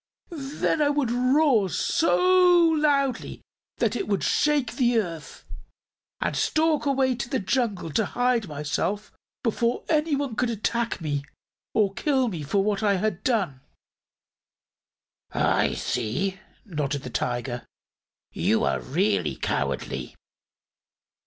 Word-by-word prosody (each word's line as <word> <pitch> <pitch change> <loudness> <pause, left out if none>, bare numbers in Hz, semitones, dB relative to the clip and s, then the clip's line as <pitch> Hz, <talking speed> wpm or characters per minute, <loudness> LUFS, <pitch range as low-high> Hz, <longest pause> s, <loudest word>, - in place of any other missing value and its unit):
"Then 300 0 -1
I 290 - +4
would 285 -5 0
roar 255 -4 +3
so 325 - +1 0.5
loudly 285 -5 0 0.4
it 390 - 0
would 200 - 0
shake 285 -6 +1
the 245 -2 +3
earth 165 -8 -4 0.7
and - - -1
stalk 310 -2 +1
away 265 -2 +2
to 240 0 -5
the 265 - 0
jungle 200 -6 -1
to 220 +6 +1
hide 245 -3 +1
myself, 155 +7 -2 0.3
before 235 +1 0
anyone 290 -5 +1
could 250 +2 0
attack 230 -1 -1
me 145 -3 -2 0.5
or 205 -3 +2
kill 265 0 +1
me 170 -7 -5
for 195 +7 0
what 205 0 0
I 205 -2 +3
had 195 -1 -2
done." 190 - 0 1.7
"I - - +1
see," 185 - -2 0.3
nodded 145 -7 -3
the 125 - -7
Tiger. 120 0 -2 0.7
"You - - +1
are 70 -2 +1
really 80 - 0
cowardly." 65 -1 -3
220 Hz, 120 wpm, -25 LUFS, 160-270 Hz, 1.7 s, I